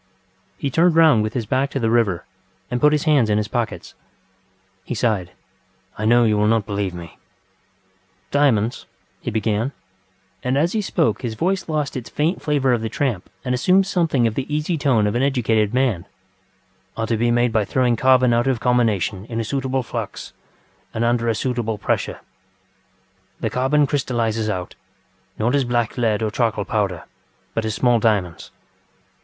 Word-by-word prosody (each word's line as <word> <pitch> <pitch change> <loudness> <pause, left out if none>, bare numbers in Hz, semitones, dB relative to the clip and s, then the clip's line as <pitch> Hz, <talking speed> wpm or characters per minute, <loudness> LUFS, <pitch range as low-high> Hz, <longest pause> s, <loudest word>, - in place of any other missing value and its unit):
ŌĆØ - - -40
He 140 - -2
turned 170 +3 +3
round 160 -9 +6
with 110 +1 -2
his 120 -3 -1
back 130 +5 0
to 140 - -3
the 115 -2 0
river, 110 -7 +1 0.5
and 125 - -1
put 150 - +5
his 150 -1 +1
hands 145 -8 +3
in 105 - +2
his 105 0 -1
pockets. 115 +1 -3 0.9
He 125 - -5
sighed. 105 -6 0 0.7
ŌĆ£I 110 - 0
know 120 +1 +5
you 105 -2 +2
will 105 - +3
not 110 -2 +2
believe 100 -3 -3
me. 85 -3 -10 1.1
ŌĆØ 140 - +1
ŌĆ£Diamonds, 115 -7 +3
ŌĆØ - - -12 0.4
he - - -1
beganŌĆöand 110 +3 0 0.9
as 165 +5 +1
he 220 - 0
spoke 170 -5 0
his 120 -4 -4
voice 185 - -1
lost 150 -3 -1
its 125 -3 -5
faint 160 +5 -1
flavour 145 -3 +1
of 120 - 0
the 110 - -3
tramp 115 -5 -2 0.2
and 125 - 0
assumed 185 +10 +3
something 165 -10 +1
of 115 - +1
the 135 +5 -4
easy 150 +3 0
tone 135 -8 +2
of 105 - 0
an 120 - 0
educated 115 -6 +1
manŌĆöŌĆ£are 95 -3 -5
to 115 0 0
be 120 +2 +1
made 120 0 +2
by 110 - +2
throwing 125 +3 +1
carbon 130 0 +4
out 120 +2 +2
of 130 -3 +1
combination 110 -6 +1
in 115 0 -4
a - - 0
suitable 130 +2 -2
flux - - -6 0.6
and 110 - 0
under 120 0 +1
a 115 - +1
suitable 120 -3 -2
pressure; 100 - -2 1.2
the - - -2
carbon 140 +4 +2
crystallises 115 -6 -1
out, 90 -3 -4 0.6
not 115 +4 0
as 140 -1 +3
black 120 -2 -1
lead 110 -3 0
or 110 - -1
charcoal 110 -3 0
powder, 100 -7 -1 0.5
but 110 +1 -1
as 110 -1 -2
small 120 -2 +3
diamonds. 100 -6 0
120 Hz, 180 wpm, -21 LUFS, 110-135 Hz, 1.2 s, round